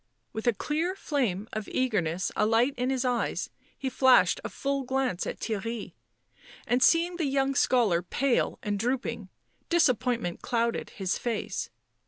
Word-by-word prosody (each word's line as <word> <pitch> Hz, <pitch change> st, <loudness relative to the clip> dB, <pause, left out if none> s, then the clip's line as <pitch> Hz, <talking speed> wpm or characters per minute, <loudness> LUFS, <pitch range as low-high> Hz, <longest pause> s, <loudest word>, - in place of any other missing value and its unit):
With 220 Hz, +2 st, -4 dB
a 240 Hz, -, +5 dB
clear 325 Hz, -, -1 dB
flame 230 Hz, -, -1 dB
of 215 Hz, -1 st, -4 dB
eagerness 190 Hz, -8 st, 0 dB
alight 225 Hz, +5 st, +3 dB
in 250 Hz, +1 st, -1 dB
his 265 Hz, -1 st, 0 dB
eyes 245 Hz, -2 st, -1 dB, 0.3 s
he 270 Hz, -, -4 dB
flashed 260 Hz, 0 st, +4 dB
a -, -, -4 dB
full 275 Hz, 0 st, -2 dB
glance 260 Hz, -6 st, -1 dB
at -, -, -5 dB
Theirry, 225 Hz, +1 st, -4 dB, 0.7 s
and, 245 Hz, +1 st, +1 dB
seeing 340 Hz, +4 st, +4 dB
the 335 Hz, -, 0 dB
young 275 Hz, 0 st, +1 dB
scholar 230 Hz, -10 st, +3 dB
pale 245 Hz, +8 st, 0 dB
and 205 Hz, -2 st, -1 dB
drooping, 250 Hz, +4 st, -2 dB, 0.4 s
disap 330 Hz, -, +4 dB
pointment 235 Hz, -8 st, -2 dB
clouded 235 Hz, -1 st, -1 dB
his 190 Hz, -3 st, -2 dB
face. 235 Hz, -3 st, -3 dB
245 Hz, 150 wpm, -28 LUFS, 215-270 Hz, 0.7 s, a